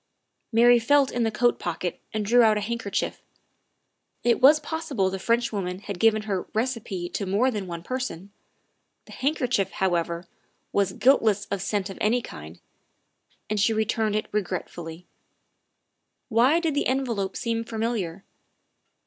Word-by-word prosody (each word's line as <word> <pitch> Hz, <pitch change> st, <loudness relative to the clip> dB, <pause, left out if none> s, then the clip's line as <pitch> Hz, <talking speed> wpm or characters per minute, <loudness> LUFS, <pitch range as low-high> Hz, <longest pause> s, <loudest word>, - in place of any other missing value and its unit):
Mary 240 Hz, +1 st, +6 dB
felt 280 Hz, +3 st, +3 dB
in 245 Hz, -, -1 dB
the 225 Hz, -, +2 dB
coat 240 Hz, +2 st, +1 dB
pocket 175 Hz, +1 st, -3 dB
and 215 Hz, -1 st, -2 dB
drew 240 Hz, +4 st, +5 dB
out 220 Hz, -2 st, +5 dB
a -, -, -1 dB
handker 230 Hz, -1 st, -4 dB
chief. -, -, -2 dB, 1.0 s
It 240 Hz, -, +4 dB
w 255 Hz, -, +3 dB
r -, -, +10 dB
as 305 Hz, +1 st, +4 dB
possible 295 Hz, -11 st, -2 dB
the 190 Hz, -, -4 dB
Frenchwoman 205 Hz, -4 st, 0 dB
had 200 Hz, -3 st, -6 dB
given 220 Hz, -1 st, +3 dB
her 195 Hz, -4 st, -3 dB
receipt 220 Hz, -7 st, -2 dB
to 200 Hz, -, -2 dB
more 220 Hz, +8 st, +2 dB
than 205 Hz, -5 st, -4 dB
one 170 Hz, -1 st, -6 dB
person. 230 Hz, -6 st, -4 dB, 0.7 s
The -, -, -15 dB
handkerchief, 255 Hz, -, 0 dB
however, 170 Hz, -2 st, -1 dB, 0.5 s
was 200 Hz, -2 st, +1 dB
guiltless 220 Hz, -6 st, +3 dB
of 200 Hz, -2 st, -1 dB
scent 200 Hz, 0 st, -2 dB
of -, -, -10 dB
any 235 Hz, +3 st, +2 dB
kind, 80 Hz, -, -10 dB, 0.9 s
and 215 Hz, 0 st, -1 dB
she 225 Hz, +3 st, +3 dB
returned 220 Hz, 0 st, 0 dB
it 215 Hz, -, 0 dB
regretfully. 175 Hz, -4 st, -4 dB, 1.2 s
Why 250 Hz, +8 st, +4 dB
did 325 Hz, -3 st, -1 dB
the 285 Hz, -, 0 dB
envelope 240 Hz, -7 st, -1 dB
seem 230 Hz, -1 st, -1 dB
familiar? 220 Hz, -6 st, -3 dB
215 Hz, 155 wpm, -25 LUFS, 190-240 Hz, 1.2 s, r